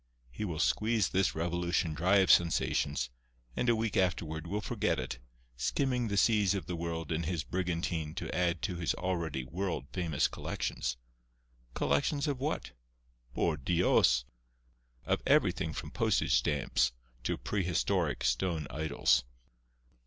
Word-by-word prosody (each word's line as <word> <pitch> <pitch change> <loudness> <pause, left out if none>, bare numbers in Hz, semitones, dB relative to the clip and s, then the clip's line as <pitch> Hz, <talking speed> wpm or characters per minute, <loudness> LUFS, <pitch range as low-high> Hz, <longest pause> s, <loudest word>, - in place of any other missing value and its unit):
He 105 - -4
will 85 -5 -3
squeeze 110 +3 +2
this 95 0 +1
revolution 85 0 0
dry 90 +6 +2
of 95 -2 +5
sensations, 70 -6 +2 0.4
and 125 - +1
a 120 - +5
week 110 -1 -1
afterward 85 -3 0
will 100 +4 -1
forget 105 - 0
it, - - -4 0.4
skimming 125 - 0
the 100 -1 -1
seas 105 -2 +4
of 95 -6 -3
the 90 - -4
world 85 -1 -4
in 80 0 0
his 85 -2 -2
brigantine 85 0 -2
to - - -4
add 90 -2 0
to 90 - -2
his 85 - 0
already 85 -7 -2
world 90 +4 -3
famous 85 -4 +1
collections. - - -3 0.8
Collections 70 - +1
of 140 -3 -1
what? 145 +3 -2 0.6
Por 80 -3 +1
Dios! 75 -5 +3 0.8
of - - +1
everything - - +3
from - - -6
postage - - +1
stamps 60 0 +2 0.3
to - - -1
prehistoric 95 -5 0
stone 75 +6 0
idols." 70 -4 +2
85 Hz, 140 wpm, -31 LUFS, 75-95 Hz, 0.8 s, of